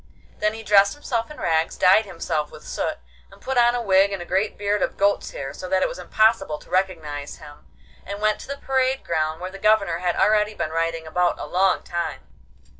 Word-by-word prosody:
Then 210 +1 +1
he 225 - -8
dressed 200 0 +4
himself 235 -6 -3
in 300 - -11
rags, 160 0 0
dyed 195 +4 +5
himself 165 -5 -3
with - - -13
soot, - - -3 0.3
and - - -16
put 265 - -4
on 240 0 +4
a 240 - -2
wig 195 -1 +4
and 195 - -3
a 175 - -7
great 190 +4 -1
beard 205 0 0
of - - -1
goat's 200 +1 +1
hair, 135 - -6
so 185 - -8
that 190 0 +2
it - - +2
was - - -7
impossible 215 -8 +2
to - - -18
recognise 160 -6 -2
him, 145 -1 -14 0.4
and 200 +1 -6
went 215 0 +1
to - - -10
the 280 +1 -5
parade 265 -1 0
ground, 155 -1 -1
where 185 +1 -5
the 195 - -10
Governor 200 -5 +2
had 180 -1 0
already 210 0 +2
been 155 - -3
riding 165 0 -1
about 175 +2 0
a - - -4
long 190 +1 +1
time. 170 0 -4
195 Hz, 220 wpm, -23 LUFS, 165-215 Hz, 0.4 s, dyed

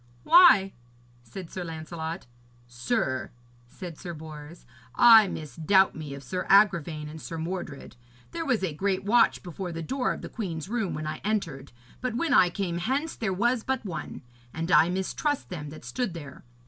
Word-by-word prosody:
'Why?' 325 - +7 0.5
said 160 +10 -10
Sir 185 - -5
Lancelot. 160 +1 -6 0.4
'Sir,' 130 - -2 0.4
said 170 +4 -9
Sir 175 -2 -6
Bors, 155 +1 -11 0.3
'I 225 -3 +8
misdoubt 160 +6 +1
me 150 -3 -6
of 140 - -10
Sir 180 +7 -4
Agravaine 170 -7 +3
and 155 +1 -9
Sir 165 - -6
Mordred. 160 -6 -6 0.3
There 335 -1 -3
was 250 -10 0
a 175 -5 -1
great 190 +4 -1
watch 235 +4 +3
before 180 0 -6
the 165 0 -5
door 255 - -1
of - - -6
the - - -5
queen's 170 -9 -5
room 220 -3 -2
when 155 - -5
I 155 - -5
entered; 165 -10 -2 0.3
but 250 -2 -2
when 305 +1 0
I 180 - +6
came 175 -2 -3
hence 275 - -1
there 215 -4 -2
was 235 +5 +1
but 265 -3 -2
one. 165 -5 -6 0.3
And 165 +3 -3
I 170 -1 +6
mistrust 190 +10 -2
them 150 -5 -6
that 155 - -11
stood 245 -9 -3
there. 145 -6 -10
180 Hz, 175 wpm, -27 LUFS, 155-215 Hz, 0.5 s, I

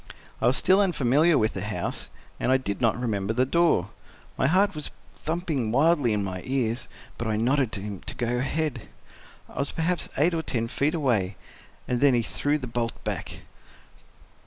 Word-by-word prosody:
I - - +3
was 125 - +3
still 190 +2 +4
unfamiliar 155 -3 +3
with 110 -2 +1
the - - -3
house, - - -3 0.3
and - - +1
I 130 - +6
did 115 -4 -4
not 115 -1 +2
remember 110 -3 -1
the 125 +2 +2
door. 150 - +2 0.4
My - - +2
heart 195 +4 +3
was 150 -2 -4 0.2
thumping 155 -8 -2
wildly 140 -1 +3
in 105 -1 0
my 95 -2 -4
ears, 125 -2 -1 0.3
but 115 - -2
I 110 - 0
nodded 125 +1 +2
to 100 - -4
him 100 -2 -5
to - - -4
go 120 0 -1
ahead. 135 -2 -2 0.6
I - - -9
was 140 - 0
perhaps 170 +2 0
eight 160 +5 +3
or 165 - 0
ten 115 -7 -2
feet 150 +7 0
away—and 120 - -3
then 140 -3 +5
he 120 - +2
threw 145 +6 0
the 135 - -6
bolt 115 -1 -2
back. - - -4
130 Hz, 185 wpm, -26 LUFS, 115-155 Hz, 0.6 s, I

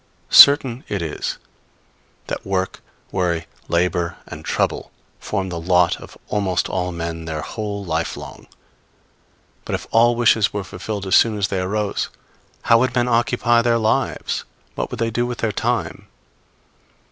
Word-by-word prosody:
Certain 135 -3 +8
it 100 - -2
is 80 -2 -4 0.9
that - - -5
work, 95 -1 -2 0.3
worry, 85 -3 -1 0.2
labor 85 0 0
and - - -9
trouble, - - -1 0.3
form 95 -2 -3
the 85 -1 -4
lot 90 +1 +3
of - - -12
almost 95 -4 0
all 90 -1 -2
men 85 -1 -5
their 80 -1 -4
whole 105 -2 -5
life 80 -1 -2
long. - - -10 1.2
But - - -2
if - - -6
all 120 +1 +4
wishes 115 -3 +3
were 100 -1 -3
fulfilled 100 +2 -6
as 95 - +2
soon 110 -2 +4
as 100 -1 0
they 95 - -1
arose, 100 +2 -1 0.5
how 115 - +5
would 130 0 0
men 120 0 +2
occupy 120 0 +2
their 115 0 +2
lives? 110 -1 0 0.3
what - - -3
would - - -6
they 115 0 0
do 120 +2 0
with 120 -1 -4
their 115 - -1
time? - - -2
100 Hz, 155 wpm, -21 LUFS, 90-115 Hz, 1.2 s, Certain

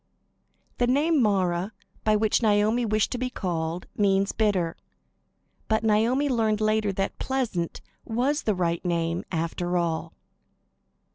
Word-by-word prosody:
'" - - -43
The 245 - +3
name 290 +4 +3
"Mara," 190 -2 +1 0.3
by 215 0 +3
which 215 +2 +2
Naomi 215 +2 +2
wished 215 -1 +1
to 250 - -2
be 255 0 -1
called 175 -6 -3
means 195 -1 +2
"bitter." 190 -6 0 0.9
But 220 0 +1
Naomi 225 +6 +2
learned 220 -5 +1
later 215 -1 +1
that 195 +1 -3
"Pleasant" 235 -11 -2 0.2
was 255 +6 0
the 215 - 0
right 170 -2 -1
name 170 -1 -1
after 175 +1 -1
all. 165 -1 -2
210 Hz, 135 wpm, -26 LUFS, 175-225 Hz, 0.9 s, The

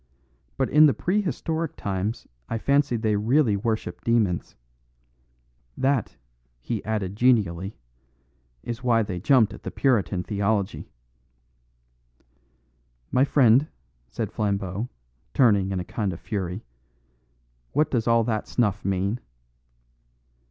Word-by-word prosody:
But 130 - 0
in 155 +1 +7
the 140 - +2
prehistoric 165 -4 -1
times 100 +3 -3 0.2
I 115 - -1
fancy 140 +2 +2
they 110 -1 +1
really 115 +2 +2
worshipped 110 +2 -3
demons. 110 -7 0 1.2
That," 135 -3 0 0.4
he 110 - -4
added 105 -3 -2
genially, 105 -6 +1 0.9
"is 120 +1 -5
why 115 -2 +3
they 95 -4 -4
jumped 110 0 +4
at - - -11
the - - -5
Puritan 100 - +1
theology." 100 0 -1 2.2
"My 130 - +4
friend," 135 0 +4 0.4
said - - -4
Flambeau, 100 +1 -2 0.5
turning 100 -7 +4
in 95 -1 -2
a 90 - -4
kind 105 -4 -2
of 85 - -9
fury, 95 -5 -4 1.1
"what 155 0 +2
does 120 -3 0
all 115 0 +4
that 110 -2 -2
snuff 105 -5 0
mean?" 100 +4 -1
110 Hz, 115 wpm, -25 LUFS, 100-125 Hz, 2.2 s, in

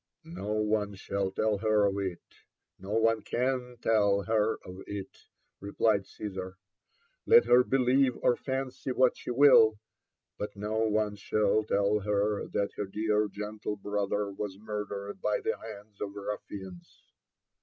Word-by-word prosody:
''No 105 +4 -1
ope 105 -1 -6
shall 100 0 -2
tell 105 +1 0
her 110 -1 +3
of 100 0 0
it 95 -3 -2 0.4
— - - -58
no 95 +3 -6
one 115 0 +3
can 125 +1 -2
tell 100 -3 +3
her 110 +2 +1
of 90 +1 -9
it," 100 -2 -8 0.3
replied 100 0 +1
Caesar; 95 -3 -7 0.7
'Met 465 +1 +7
her 125 +1 +6
believe 130 0 +2
or 120 - +4
fancy 130 0 -4
what 130 0 +3
she - - -9
will, 120 -4 +6 0.6
but 105 -1 -4
no 105 +2 -2
one 105 -1 +1
shall 105 +1 +1
tell 100 0 +1
her 105 0 0
that 100 0 -1
her 105 - -2
dear 105 +1 0
gentle 105 +1 -5
brother 100 0 -2
was 100 -1 -5
murdered 100 -1 -5
by 125 0 +1
the - - -1
hands 105 -2 -11
of 100 0 -4
ruf 105 +1 -4
fians." 95 -3 -10
105 Hz, 150 wpm, -29 LUFS, 100-110 Hz, 0.7 s, Met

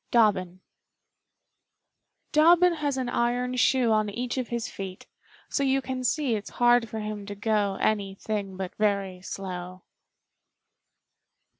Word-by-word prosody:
_ - - -46
Dobbin 185 -6 +2 1.7
Dobbin 345 +3 +6
has 290 -4 -2
an 260 -1 -1
iron 245 +1 0
shoe 250 -2 +3
On 215 -1 +2
each 245 +5 -3
of 250 - -3
his 235 -1 -3
feet, 190 -1 -7 0.4
so - - -1
you 270 0 +2
Can 260 -1 -4
see 275 -1 +1
it's 210 -2 -3
hard 240 -1 +4
for 220 0 -4
him 210 -1 -5
to 205 - -5
go 205 -1 0
Anything 200 -1 -2
but 185 -1 -4
very 200 -3 0
slow. 185 -1 -6
220 Hz, 135 wpm, -27 LUFS, 195-250 Hz, 1.7 s, Dobbin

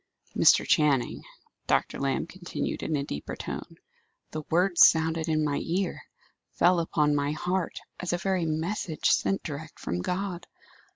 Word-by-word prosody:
"Mr. - - +5
Channing," 145 -5 +2 0.5
Dr. - - +1
Lamb 135 -1 0
continued 175 +1 -5
in 155 - -1
a 140 - -1
deeper 75 - -5
tone, - - -7 0.5
"the 155 - -4
words 175 +1 +3
sounded 160 0 +4
in 155 -1 +2
my 145 -1 0
ear, 185 +2 -2 0.5
fell 175 +1 +4
upon 150 -3 +1
my 145 0 0
heart, 180 +2 -2 0.2
as 180 - -2
a 175 - +1
very 180 -1 0
message 160 +1 -1
sent 195 - +1
direct 155 0 -7
from 90 +1 -3
God. 180 - -3
165 Hz, 150 wpm, -27 LUFS, 150-180 Hz, 0.5 s, Mr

